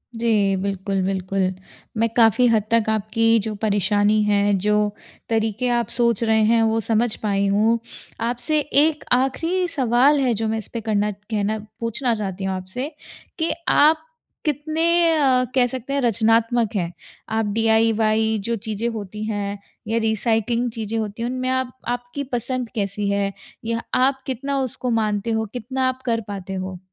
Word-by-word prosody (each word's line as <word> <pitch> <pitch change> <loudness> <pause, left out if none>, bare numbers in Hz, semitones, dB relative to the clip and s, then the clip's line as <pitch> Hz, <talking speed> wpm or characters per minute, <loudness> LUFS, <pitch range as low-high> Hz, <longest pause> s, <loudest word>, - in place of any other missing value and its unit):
जी, 215 -4 +2
बिल्कुल, 195 0 -2
बिल्कुल। 195 0 -2 0.6
मैं 225 +1 +3
काफ़ी 230 +1 +5
हद 220 -3 +3
तक 230 -1 +4
आपकी 220 +2 +2
जो 215 +1 -3
परेशानी 205 0 +2
है 205 0 +2
जो 210 +3 +1 0.5
तरीके 225 +2 0
आप 235 -2 -1
सोच 235 -2 +1
रहे 220 -1 +3
हैं 230 -1 +4
वो 225 0 +2
समझ 225 +1 +1
पाई 200 -1 +1
हूँ। 215 +4 +3 0.5
आपसे 245 +6 0
एक 295 +1 +2
आख़िरी 325 +9 +1
सवाल 270 -1 +3
है 255 -3 +2
जो 225 0 -1
मैं 220 +1 -1
इस 220 - -6
पे 230 - -3
करना 210 -1 0
कहना 210 +1 -3 0.2
पूछना 230 +2 -1
चाहती 195 -3 -4
हूँ 190 0 -1
आपसे, 185 +10 -5 0.5
कि 325 - +1 0.2
आप 310 +2 +4 0.4
कितने 310 +2 0 0.3
अ, 260 -4 +3
कह 250 -2 +4
सकते 260 +1 -5
हैं 280 - +1
रचनात्मक 230 0 +2
हैं? 175 -3 -1 0.4
आप 220 0 0
डी 225 +1 +1
आई 225 +1 +4
वाई 220 0 +2
जो 235 +3 -1
चीज़ें 220 +1 -3
होती 210 -2 -6
हैं 205 -2 -3 0.3
या 225 +1 0
रिसाइक्लिंग 225 +2 0
चीज़ें 225 -1 -4
होती 215 +1 -4
हैं 240 - -1
उनमें 255 0 -2
आप 260 -1 -1
आपकी 245 +3 -3
पसंद 250 0 -2
कैसी 200 -1 -1
है? 200 0 0 0.3
या 230 0 -1
आप 265 +1 +2
कितना 275 +2 -2
उसको 255 -1 -3
मानते 215 -1 0
हो? 220 0 0
कितना 255 +2 -1
आप 255 0 -2
कर 230 -2 +1
पाते 195 -2 -6
हो? 185 -1 -5
225 Hz, 165 wpm, -22 LUFS, 210-250 Hz, 0.6 s, काफ़ी